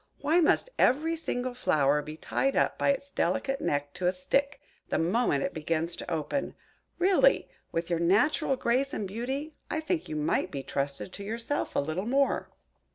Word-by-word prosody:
Why 330 +4 +2
must 355 +9 +3
every 315 +6 +3
single 255 -6 -3
flower 150 - +2
be 155 +1 -8
tied 270 +10 0
up - - +2
by - - +2
its 280 0 -1
delicate 270 +10 0
neck 145 0 -1
to 180 - -1
a - - +4
stick, 275 +10 0 0.3
the - - +1
moment 170 - +1
it - - -2
begins 165 +2 -1
to - - -7
open? 160 - -2 0.4
Really, 385 +8 +4 0.2
with 165 +1 -2
your 170 - +1
natural 250 - +3
grace 260 +4 0
and 205 - -3
beauty, 265 +9 -4 0.2
I 315 - -1
think 320 +1 -2
you 155 - -3
might 150 0 0
be 140 -2 -5
trusted 140 +7 -3
to 200 - -7
yourself 230 +7 -3
a - - +3
little 160 +8 -2
more!" 275 +2 +1
230 Hz, 180 wpm, -29 LUFS, -, 0.4 s, a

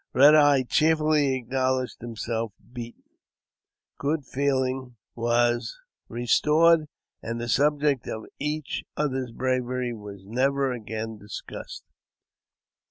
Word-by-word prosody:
Eed 145 +3 +8
Eyes 145 -3 +6
cheerfully 155 -3 +3
acknowledged 130 0 -1
himself 115 -1 -3 0.2
beaten, 120 -1 -8 1.0
good 145 0 -1
feeling 130 -2 -1 0.2
was 120 - +1 0.3
restored, 155 +7 +3 0.3
and 115 +1 -4
the 120 - -4
subject 145 0 +2
of 110 0 -5
each 150 0 -3
other's 130 -4 -1
bravery 125 0 -1
was 100 -3 -10
never 135 +4 +1
after 110 -1 -5
discussed. 105 +1 -8
130 Hz, 100 wpm, -26 LUFS, 120-145 Hz, 1.0 s, Eed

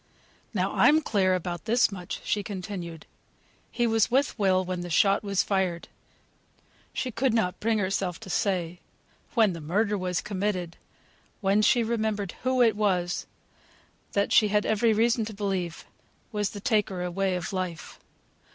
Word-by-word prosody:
"Now - - -1
I'm 310 +2 +5
clear 190 -6 +2
about 175 -1 -4
this 235 0 +3
much," 180 -3 -6
she 210 - 0
continued, 185 -5 -6 0.7
"he 240 - 0
was 225 -2 +2
with 265 -1 +1
Will 185 -2 +3
when 180 -1 -3
the 175 - -6
shot 195 +4 +3
was 200 -2 +1
fired 185 -4 -1 1.0
(she 255 - -3
could 235 +1 +1
not 180 -6 0
bring 225 0 +1
herself 190 -3 -1
to - - -9
say, 180 -4 -1 0.6
when 220 -5 +4
the 165 - -7
murder 205 +7 0
was 180 -1 -1
committed, 185 -4 -2 0.6
when 200 0 +2
she 235 +2 +4
remembered 220 -4 -1
who 255 0 +3
it 225 -2 +3
was 185 -4 0 0.9
that, 200 0 +1
she 215 - +6
had 210 0 +1
every 220 +1 +2
reason 230 +2 +2
to 215 -1 -7
believe, 190 -5 -3 0.5
was 210 -2 -1
the 205 - -8
taker 205 -6 0
away 185 +1 -1
of 180 +1 -4
life). 185 -4 -5
200 Hz, 155 wpm, -27 LUFS, 180-220 Hz, 1.0 s, she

